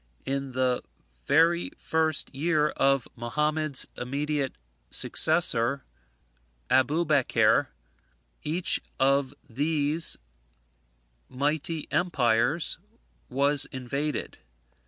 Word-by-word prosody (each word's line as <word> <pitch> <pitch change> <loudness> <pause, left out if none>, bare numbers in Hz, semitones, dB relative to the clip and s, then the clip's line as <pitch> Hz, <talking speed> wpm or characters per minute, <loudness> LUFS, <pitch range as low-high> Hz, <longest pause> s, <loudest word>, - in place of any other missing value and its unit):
In 135 -1 -3
the 130 -1 +1 0.4
very 170 +2 +3
first 160 -3 0
year 150 +1 +1
of 135 -4 +1
Mohammad's 150 +4 -1
immediate 140 +2 -2 0.3
successor, 120 +4 +3 0.9
Abubeker, 150 0 +3 0.7
each 165 +4 0 0.2
of 135 0 +2 0.2
these 150 +5 0 1.1
mighty 150 +4 -2
empires 145 -3 +1 0.5
was 140 +1 +2
invaded. 140 +3 -4
145 Hz, 70 wpm, -27 LUFS, 130-155 Hz, 1.1 s, very